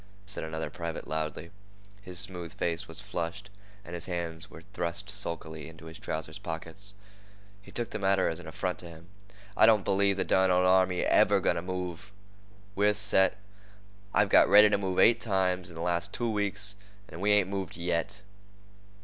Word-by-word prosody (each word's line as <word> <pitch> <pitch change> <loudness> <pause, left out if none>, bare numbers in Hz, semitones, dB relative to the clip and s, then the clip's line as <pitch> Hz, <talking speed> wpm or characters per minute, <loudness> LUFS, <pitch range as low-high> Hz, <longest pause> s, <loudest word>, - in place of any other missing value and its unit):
said 95 - -6
another 80 0 -4
private 85 -1 -5
loudly. 80 +2 -4 0.5
His 90 -3 -8
smooth 90 -3 -4
face 85 +2 -2
was 80 - -9
flushed, 95 0 -5 0.3
and 85 - -9
his 85 - -1
hands 85 -3 -4
were 80 - -12
thrust 90 +2 -3
sulkily 80 -6 -4
into 80 0 -14
his 80 +3 -10
trouser's 80 -5 -4
pockets. 85 +5 -7 0.7
He - - -16
took 120 -1 -4
the 110 - -3
matter 95 -1 +2
as 80 - -2
an 90 - -10
affront 90 +3 -3
to 85 - -7
him. 85 +1 -14 0.5
"I - - +6
don't 110 -4 +4
believe 100 0 +2
the - - +1
derned 95 0 +3
old 90 0 +4
army's 95 -1 +3
ever - - +5
going - - +1
to - - -1
move. 90 +1 -5 0.6
We're 105 +1 +3
set. 100 -2 +3 0.7
I've 105 -1 +3
got - - +6
ready 105 +1 +8
to 105 - +2
move 95 -2 -2
eight 115 - +5
times 90 -4 0
in 85 - -12
the 80 - -6
last 85 0 -1
two 120 -1 -1
weeks, 100 -1 -2 0.3
and 85 - -9
we 105 - +2
ain't 105 -3 +4
moved 95 -4 -4
yet." 90 +4 -2
90 Hz, 185 wpm, -29 LUFS, 85-100 Hz, 0.7 s, ready